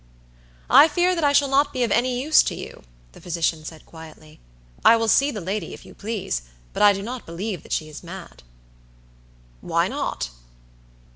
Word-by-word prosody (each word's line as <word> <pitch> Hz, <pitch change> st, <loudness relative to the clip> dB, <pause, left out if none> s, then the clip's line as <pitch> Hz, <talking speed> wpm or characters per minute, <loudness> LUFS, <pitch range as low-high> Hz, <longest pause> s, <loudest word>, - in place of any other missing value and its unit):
"I 310 Hz, -, +8 dB
fear 350 Hz, +4 st, +1 dB
that 335 Hz, -3 st, -2 dB
I 290 Hz, -, +4 dB
shall 285 Hz, 0 st, +4 dB
not 280 Hz, +2 st, +2 dB
be 255 Hz, -2 st, -1 dB
of 230 Hz, -, -1 dB
any 245 Hz, +2 st, +1 dB
use 305 Hz, +4 st, +5 dB
to -, -, -3 dB
you," -, -, -9 dB, 0.3 s
the -, -, -16 dB
physician 165 Hz, -2 st, -1 dB
said, 155 Hz, 0 st, -10 dB
quietly; 155 Hz, -1 st, -14 dB, 0.4 s
"I 230 Hz, -, +7 dB
will 225 Hz, 0 st, -1 dB
see 275 Hz, +5 st, +4 dB
the 220 Hz, -, -5 dB
lady, 190 Hz, -1 st, -4 dB
if -, -, -16 dB
you -, -, -13 dB
please, 205 Hz, -, -4 dB, 0.3 s
but -, -, -3 dB
I 205 Hz, 0 st, +8 dB
do 195 Hz, 0 st, -3 dB
not 245 Hz, +3 st, -7 dB
believe 180 Hz, +1 st, -5 dB
that -, -, -16 dB
she 155 Hz, -, -1 dB
is 155 Hz, -1 st, -10 dB
mad." 175 Hz, +1 st, -10 dB, 1.2 s
"Why -, -, 0 dB
not?" 60 Hz, -1 st, -3 dB
210 Hz, 190 wpm, -23 LUFS, 165-265 Hz, 1.2 s, I